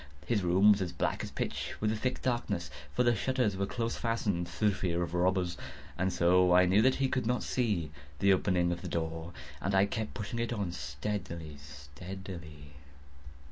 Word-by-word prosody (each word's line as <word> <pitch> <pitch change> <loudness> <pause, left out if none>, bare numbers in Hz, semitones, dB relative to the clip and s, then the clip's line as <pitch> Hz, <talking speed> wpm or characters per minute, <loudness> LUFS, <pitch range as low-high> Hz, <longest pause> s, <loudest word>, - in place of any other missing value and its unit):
His 115 -4 +1
room 95 +4 +5
was 100 -1 +3
as 90 -2 -2
black 85 - -1
as - - -5
pitch - - -3
with 105 0 +1
the - - 0
thick 125 +4 -2
darkness, 115 -8 -1 0.2
(for 125 - +2
the 120 -1 +4
shutters 125 -2 +1
were 100 +1 -1
close 115 +1 -2
fastened, 105 -7 -1
through 105 -2 +1
fear 85 -2 -1
of 85 -1 -5
robbers,) 90 0 +1 0.4
and 95 +1 0
so 90 +1 +4
I 90 0 +7
knew 95 +4 +4
that 130 +3 +4
he 135 - +1
could 130 -3 -1
not 125 +1 +1
see 105 - 0 0.3
the 100 +5 +5
opening 90 -2 +2
of 85 0 -3
the 90 - -5
door, 80 0 -3 0.3
and 95 +4 0
I 95 +1 +5
kept 110 +1 -4
pushing 115 +1 -4
it 115 0 -1
on 100 -6 -2
steadily, 80 +1 -5
steadily. 75 +2 -9
95 Hz, 190 wpm, -31 LUFS, 85-110 Hz, 0.4 s, I